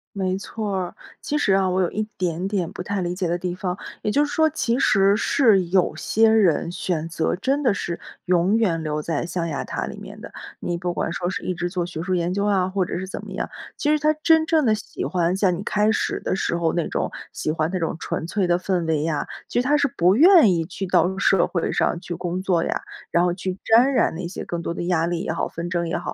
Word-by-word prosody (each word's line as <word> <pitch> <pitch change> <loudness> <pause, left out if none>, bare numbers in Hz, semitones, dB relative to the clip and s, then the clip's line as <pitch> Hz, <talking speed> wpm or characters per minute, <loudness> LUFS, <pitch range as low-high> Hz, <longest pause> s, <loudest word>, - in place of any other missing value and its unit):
没 190 -1 -1
错 205 0 -4
儿。 185 -2 -3 0.3
其 295 - -1
实 205 -9 +2
啊， 190 -1 +3
我 185 +1 +1
有 175 - +1
一 215 - -1
点 180 0 -1
点 185 -5 -1
不 180 - -6
太 200 0 -2
理 175 0 -2
解 180 -1 -1
的 175 +1 0
地 180 0 -3
方。 180 -1 -3 0.2
也 210 - -1
就 290 +4 +3
是 290 - -6
说 315 0 +4
其 235 -3 0
实 195 -5 +4
是 220 -3 +3
有 180 0 +2
些 225 +1 +3
人 190 -7 +3
选 165 -3 -2
择 165 +1 -1
真 275 +8 0
的 235 -6 +3
是 170 -3 -4 0.3
永 180 +4 +3
远 170 -8 +1
留 150 0 -2
在 160 +1 -2
象 170 0 -2
牙 145 -4 -3
塔 - - -4
里 - - -7
面 - - -10
的， - - -10 0.3
你 175 - -2
不 175 0 -2
管 165 - -2
说 175 0 -2
是 - - -4
一 185 - -1
直 175 0 -3
做 175 -2 -2
学 165 -2 -6
术 185 +1 -1
研 175 +1 0
究 200 +1 0
啊， 195 -3 +2
或 190 -1 0
者 - - -4
是 190 - -5
怎 - - -6
么 - - -9
样。 - - -3 0.3
其 295 - 0
实 305 - +3
他 305 +1 +3
真 320 -1 +5
正 315 -3 +2
地 220 -2 +4
喜 215 - -6
欢 180 0 0
像 190 -3 +2
你 185 - -6
开 210 +1 +2
始 - - -1
的 - - -2
时 170 - -1
候 165 -1 0
那 170 - 0
种 - - -1 0.2
喜 - - -2
欢 155 +1 0
那 185 - -1
种 165 -1 -2
纯 160 - -3
粹 190 0 0
的 175 0 +2
氛 180 -3 -1
围 155 -2 0
呀， 160 -2 -1 0.2
其 245 - +1
实 - - -4
他 295 +1 +4
是 285 -1 +2
不 180 +3 +4
愿 335 - +7
意 165 -2 0
去 190 +3 -5
到 180 +2 +2
社 195 -1 +3
会 170 - -1
上 170 - +1
去 175 - -5
工 180 +2 -3
作 180 -3 +1
呀， - - -2 0.3
然 170 - +3
后 175 -1 +2
去 185 0 -4
沾 240 +5 +5
染 - - +2
那 175 +1 -4
些 180 - -6
更 170 -1 -4
多 170 - -3
的 175 - -4
压 175 -2 +1
力 170 -1 -2
也 - - -2
好、 165 - -1
纷 170 +1 -6
争 170 -1 -1
也 - - -1
好。 - - -5
185 Hz, 280 characters per minute, -23 LUFS, 170-205 Hz, 0.3 s, 愿